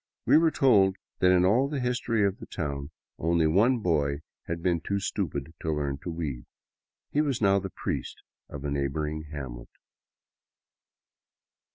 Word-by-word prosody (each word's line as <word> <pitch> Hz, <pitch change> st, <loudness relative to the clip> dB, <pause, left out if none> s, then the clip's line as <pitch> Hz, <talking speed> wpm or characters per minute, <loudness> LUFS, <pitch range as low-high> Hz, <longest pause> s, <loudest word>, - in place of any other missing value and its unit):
We -, -, +5 dB
were 165 Hz, 0 st, +4 dB
told 100 Hz, -11 st, +4 dB, 0.2 s
that 90 Hz, -, +5 dB
in 90 Hz, 0 st, +5 dB
all 125 Hz, +8 st, +3 dB
the 145 Hz, -2 st, -2 dB
history 120 Hz, -3 st, +1 dB
of 100 Hz, -1 st, -1 dB
the -, -, -9 dB
town 70 Hz, -4 st, -4 dB, 0.3 s
only 85 Hz, 0 st, +2 dB
one 105 Hz, +11 st, +4 dB
boy 75 Hz, -5 st, +1 dB, 0.3 s
had 85 Hz, 0 st, -4 dB
been 85 Hz, -3 st, +1 dB
too 100 Hz, +3 st, -1 dB
stupid 80 Hz, -7 st, -3 dB
to 80 Hz, -, -1 dB
learn 70 Hz, -2 st, -2 dB
to 85 Hz, -, -6 dB
weave. 75 Hz, -7 st, -4 dB, 0.7 s
He 150 Hz, -, +2 dB
was 140 Hz, -5 st, 0 dB
now 100 Hz, -2 st, +4 dB
the 95 Hz, 0 st, -5 dB
priest -, -, -4 dB, 0.3 s
of 70 Hz, 0 st, -7 dB
a 70 Hz, -, -1 dB
neighboring 75 Hz, +2 st, -2 dB
hamlet. 65 Hz, -5 st, -7 dB
85 Hz, 160 wpm, -28 LUFS, 75-100 Hz, 0.7 s, We